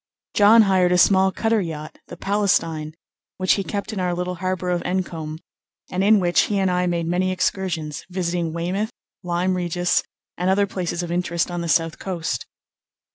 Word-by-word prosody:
John 220 +2 +7
hired 185 -3 +3
a 180 - +4
small 190 +1 +5
cutter 225 +1 +1
yacht, 155 -3 -6
the - - -9
Palestine, 165 -6 0 0.4
which 185 0 +1
he 195 - -1
kept 205 +2 -4
in 205 - -3
our 180 -1 0
little 180 +1 -2
harbour 185 -1 -1
of 175 -1 0
Encombe, 165 -4 -3 0.5
and 185 +1 0
in 210 +1 +5
which 175 -2 +3
he 205 - 0
and 190 -1 +2
I 180 0 +1
made 170 -1 -1
many 180 +2 0
excursions, 175 -5 -2
visiting 175 -2 -2
Weymouth, 180 +6 -2 0.3
Lyme 180 +1 0
Regis, 175 0 +1 0.4
and 180 +1 +1
other 200 +1 +3
places 180 -2 -3
of 170 - -5
interest 175 0 -1
on 175 0 -3
the 170 - -3
south 165 -1 +1
coast. 170 -9 -3
180 Hz, 180 wpm, -22 LUFS, 170-190 Hz, 0.5 s, John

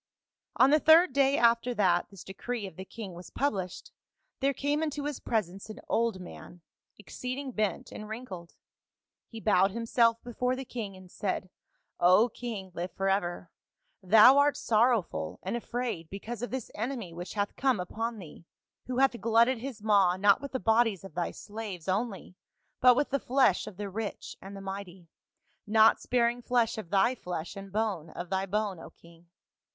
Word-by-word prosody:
"On 265 - +5
the 305 - +5
third 320 0 +6
day 275 0 +3
after 235 +1 +3
that 180 -5 +2
this 195 -3 -12
decree 225 +3 -5
of 190 - -9
the 190 - -8
king 205 -3 -8
was 175 +1 -10
published, 190 -10 -3 0.5
there 275 0 +2
came 285 +3 -1
into 295 -2 -2
his 295 -2 -3
presence 195 -2 -3
an 215 - -8
old 230 -4 0
man, 180 -1 -11 0.4
exceeding 255 +6 -6
bent 215 -4 -2
and 215 0 -8
wrinkled; 205 -7 -8 0.7
he 225 - -9
bowed 195 -3 +3
himself 230 +1 +2
before 250 +1 -1
the 265 +1 -6
king 210 -6 -6
and 185 -1 -15
said, 185 -3 -3 0.3
' - - -50 0.2
O 230 +5 +4
king, 220 -6 -6
live 180 +1 -4
forever! 195 -2 -1 0.5
thou 220 +8 +7
art 290 0 +3
sorrowful 220 - +1
and 190 +5 -2
afraid 240 -8 -4
because 215 +3 -6
of 245 - -3
this 260 -3 -5
enemy 225 -5 -4
which 175 +4 -7
hath 205 -1 -1
come 260 -6 +1
upon 225 +6 -3
thee, 170 -4 -11 0.4
who 250 -1 -3
hath 265 -4 +2
glutted 230 +3 +3
his 240 -4 -7
maw 200 -4 +4
not 200 +3 +4
with 280 - -7
the 260 - -2
bodies 225 -4 +2
of 195 - -10
thy 175 -1 -1
slaves 205 -5 -8
only 195 -1 -2 0.5
but 250 -1 +7
with 290 +2 0
the 275 - +1
flesh 255 -7 +2
of 200 - -9
the 205 0 -4
rich 205 +2 -5
and 195 +1 -9
the - - -8
mighty, 190 -3 -8 0.6
not 220 +1 +5
sparing 240 0 +1
flesh 240 -2 +1
of 180 - -8
thy 200 +6 +3
flesh 180 -6 -6
and 195 -1 -9
bone 200 -6 -2
of 175 +1 -8
thy 190 0 0
bone, 205 -2 -1
O - - -10
king. 170 0 -20
215 Hz, 180 wpm, -29 LUFS, 190-245 Hz, 0.7 s, thou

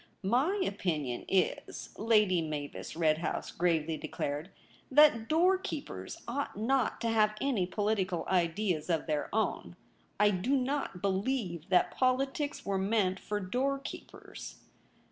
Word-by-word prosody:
'My 265 - +2
opinion 155 - -2
Is,' 190 -2 -1
Lady 210 -5 +3
Mavis 150 -1 -5
Redhouse 160 0 0
gravely 165 -2 +1
declared, 150 +2 -4 0.2
' - - -29
that 230 -7 +6
doorkeepers 360 +1 0
ought 260 -2 -3
not 255 +5 +1
to 230 - 0
have 215 -1 +3
any 235 -10 0
political 190 -4 -1
ideas 180 -1 0
of 165 -3 +1
their 150 -2 -1
own. 220 +1 -1 0.4
I 210 0 +5
do 200 +9 +1
not 265 -8 -2
believe 195 - -1
that 180 - +4
politics 270 +3 0
were 195 -1 0
meant 195 -1 +1
for 210 0 -3
doorkeepers.' 265 +8 -4
200 Hz, 125 wpm, -31 LUFS, 175-255 Hz, 0.4 s, that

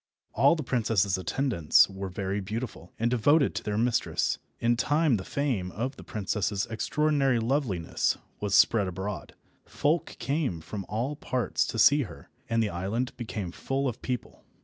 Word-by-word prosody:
All - - +5
the 155 - -4
princess's 110 -6 +1
attendants 95 - +3
were 95 0 -6
very 95 +2 -2
beautiful, 105 -2 -5
and 115 +1 +1
devoted 140 +5 +4
to - - -3
their 105 -1 -2
mistress. 115 +1 +1 0.2
In 120 +1 +2
time 145 +1 +2
the 95 - -5
fame 120 -11 -1
of 130 +7 -3
the - - -11
princess's 100 -1 -1
extraordinary 135 +3 +1
loveliness 115 - 0 0.2
was 105 -2 0
spread 105 -4 +5
abroad. 95 +3 -5 0.3
Folk 155 +4 0
came 135 - -1
from 95 +4 -7
all 120 +7 -2
parts 130 -4 -1
to - - -4
see 145 +7 +6
her, 95 - -8 0.2
and 115 0 +2
the 105 - 0
island 100 +9 -2
became 105 -6 -5
full 135 +8 -2
of 125 -2 -4
people. 125 -2 -5
115 Hz, 160 wpm, -28 LUFS, 100-135 Hz, 0.3 s, see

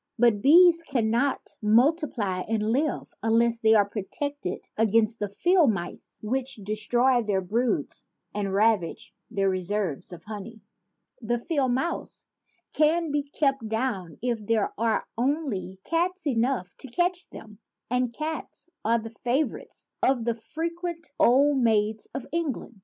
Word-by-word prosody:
But 230 -3 +3
bees 335 - +7
cannot 245 -2 0
multiply 230 - +2
and 220 0 0
live 285 +4 -1
unless 230 +1 +2
they 220 -1 +5
are 205 -2 +4
protected 225 +3 -4
against 225 +1 +2
the 205 - -2
field 345 - +3
mice 175 -3 -6
which 260 +4 -2
destroy 230 +5 +1
their 205 -4 0
broods 225 +7 -1 0.3
and 200 -2 -2
ravage 200 -3 +1 0.2
their 200 -4 0
reserves 185 -4 -2
of 170 -2 -10
honey. 220 +2 -8 0.6
The 240 +1 0
field 265 -1 0
mouse 330 +7 -3 0.5
can 315 +1 +2
be 290 0 +1
kept 275 -4 -1
down 215 -7 -2
if 235 -3 -1
there 220 0 0
are 225 0 0
only 245 - -1
cats 355 - -1
enough 240 -7 0
to - - -7
catch 355 +7 -1
them; 215 -2 -12 0.3
and 250 -1 +1
cats 310 +6 -5 0.2
are 230 +2 +3
the 225 0 -6
favor 245 +4 -1
ites - - -12
of 250 -4 +2
the 235 - +1
frequent 335 +7 -5
old 275 +3 +5
maids 220 -2 +1
of 270 - -4
England. 295 -9 -3
235 Hz, 140 wpm, -26 LUFS, 210-285 Hz, 0.6 s, bees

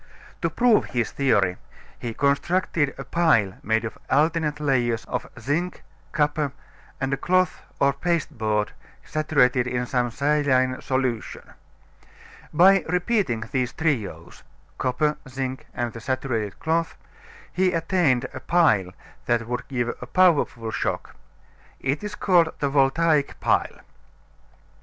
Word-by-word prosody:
To - - +1
prove 240 -3 +3
his 120 -3 -2
theory, 105 -10 +2 0.4
he 115 -2 -5
constructed 145 +1 +1
a - - -6
pile 115 - +2
made 110 +2 0
of 110 - -7
alternate 150 +1 +1
layers 120 -6 0
of 125 - -4
zinc, 155 +9 -2 0.3
copper, 150 -2 0 0.5
and 135 0 -1
a - - 0
cloth 185 0 +1 0.2
or 140 0 +3
pasteboard 125 -10 -1 0.3
saturated 135 -5 +2
in 125 0 -1
some 125 0 0
saline 130 -1 +1
solution. 130 -4 -3 1.0
By 190 +4 +6
repeating 180 - 0
these 125 -2 -1
trios 110 - -2 0.4
copper, 150 +4 0
zinc, 130 0 -4
and 120 -2 -3
the 115 - -8
saturated 120 -5 -2
cloth 165 +1 -1 0.6
he 185 0 +2
attained 165 -7 +1
a - - -6
pile 130 - +2 0.3
that 120 -1 +1
would 125 +1 -4
give 120 -3 -1
a 125 - -7
powerful 145 -10 +2
shock. - - -3 0.6
It 135 +7 -2
is 210 0 -5
called 175 -6 +3
the 140 - 0
Voltaic 145 +2 +2
Pile. - - 0
135 Hz, 125 wpm, -24 LUFS, 120-160 Hz, 1.0 s, By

